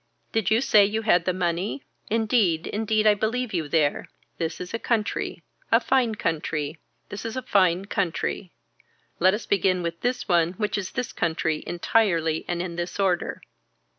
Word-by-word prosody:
Did 220 -4 +1
you 220 +2 +3
say 215 -6 +6
you 220 +3 0
had 175 -6 +3
the 185 - +2
money. 180 +7 -2 0.3
Indeed 215 -7 +2
indeed 215 0 0
I 210 - +7
believe 220 +3 -2
you 165 -4 -1
there. 150 -3 +1 0.3
This 165 -1 -2
is 180 +2 -7
a 230 - -1
country. 225 -3 -1 0.3
A 230 - +6
fine 245 -3 +1
country. 155 -4 -2 0.3
This 205 - -6
is 225 +2 -4
a 260 - -3
fine 185 -5 +2
country. 185 -1 -2 0.7
Let 185 +3 +5
us 220 - -6
begin 185 -2 +1
with 170 0 -4
this 245 +1 -1
one 170 -2 +3
which 210 +2 -2
is 195 -3 -4
this 250 - -3
country 160 -1 -1
entirely 170 -4 +1
and 175 0 -1
in 170 -2 -6
this 175 +3 -4
order. 185 -3 0
190 Hz, 170 wpm, -25 LUFS, 170-220 Hz, 0.7 s, I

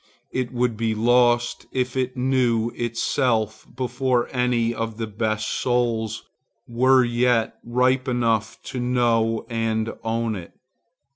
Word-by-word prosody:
It 130 -1 -2
would 120 -2 0
be 110 -1 0
lost 120 +1 +2
if 125 -1 -1
it 130 0 -1
knew 125 -3 +1
itself 115 -1 -1
before 125 -1 0
any 125 -2 +1
of 115 -1 -4
the 115 - -2
best 110 0 -2
souls 120 -3 -1 0.4
were 130 +2 +4
yet 120 -1 +1
ripe 130 +2 +1
enough 115 -3 0
to 130 - -5
know 120 -2 +1
and 115 -1 -1
own 115 0 -1
it. 85 -3 -9
120 Hz, 125 wpm, -23 LUFS, 115-125 Hz, 0.4 s, were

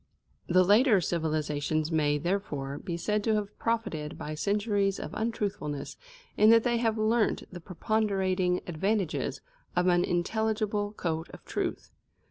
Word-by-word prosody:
The 185 +1 +5
later 210 +3 +5
civilisations 155 -2 -1
may, 150 -2 +2
therefore, 145 -5 -2
be 170 -2 -4
said 210 +4 -1
to 220 0 +2
have 210 -1 -3
profited 220 -10 -2
by 150 - -5
centuries 200 +3 0
of - - -6
untruthfulness 205 -10 -3 0.4
in 215 +1 +6
that 230 0 +6
they 240 -1 +1
have 225 -1 +1
learnt 220 +1 +1
the 175 - -6
preponderating 190 -1 0
advantages 190 +1 -1 0.3
of 180 0 +2
an 175 -1 +4
intelligible 210 +3 -1
code 165 -5 -3
of - - -13
truth. - - -3
195 Hz, 135 wpm, -29 LUFS, 160-215 Hz, 0.4 s, in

